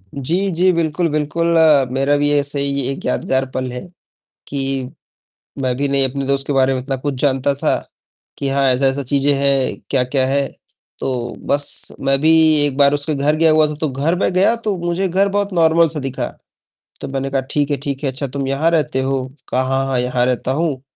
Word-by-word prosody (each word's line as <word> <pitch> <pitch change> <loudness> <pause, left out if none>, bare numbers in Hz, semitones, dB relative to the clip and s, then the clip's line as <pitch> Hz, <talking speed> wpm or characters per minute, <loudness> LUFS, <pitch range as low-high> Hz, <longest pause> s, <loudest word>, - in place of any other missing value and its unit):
जी, 170 +9 -1
जी 180 +2 +3
बिल्कुल, 165 0 0
बिल्कुल, 155 +2 -1 0.5
मेरा 135 +2 +2
भी 145 0 +1
ऐसे 140 0 -2
ही 140 0 -1
एक 135 - -7
यादगार 130 0 0
पल 130 -1 -2
है। 125 0 -6 0.7
कि 135 -2 -2 0.7
मैं 130 -1 0
भी 140 - 0
नहीं 135 -1 +2
अपने 135 +1 -4
दोस्त 140 0 0
के - - -1
बारे 135 -1 +3
में 130 - -2
इतना 135 +1 -3
कुछ 140 +2 -3
जानता 140 0 +1
था 140 - 0 0.6
कि 140 - -2
हाँ, 135 0 +1
ऐसा-ऐसा 135 +2 +1
चीजें 140 +2 +1
हैं, 140 -1 +1
क्या-क्या 130 0 +1
है, 140 +1 +1 0.5
तो 120 -2 -3
बस, 145 0 0
मैं 135 0 +1
भी 160 +2 +4 0.3
एक 140 -2 -3
बार 140 0 +4
उसके 145 +1 -2
घर 145 +2 +1
गया 160 0 +4
हुआ 155 0 +4
था, 150 - -4
तो 155 +1 -2
घर 140 +6 0
में 185 - +1
गया 190 +5 +3
तो 210 -3 0
मुझे 175 +2 -1
घर 195 +3 +2
बहुत 200 0 -1
नार्मल 165 0 +4
सा 155 -1 -3
दिखा। 135 -1 -3 0.8
तो - - -4
मैंने 135 0 -3
कहा 135 -1 0
"ठीक 145 -1 0
है, 145 - +1
ठीक 140 0 -4
है, 140 - +1
अच्छा 140 +2 -4
तुम 135 +1 -4
यहाँ 140 +4 +1
रहते 150 -4 0
हो?" 135 -1 -1 0.2
कहा 130 - +1
"हाँ, 135 +1 0
हाँ, 130 -2 0
यहाँ 125 0 +1
रहता 125 0 -1
हूँ।" 145 -2 -1
140 Hz, 205 wpm, -18 LUFS, 135-155 Hz, 0.8 s, भी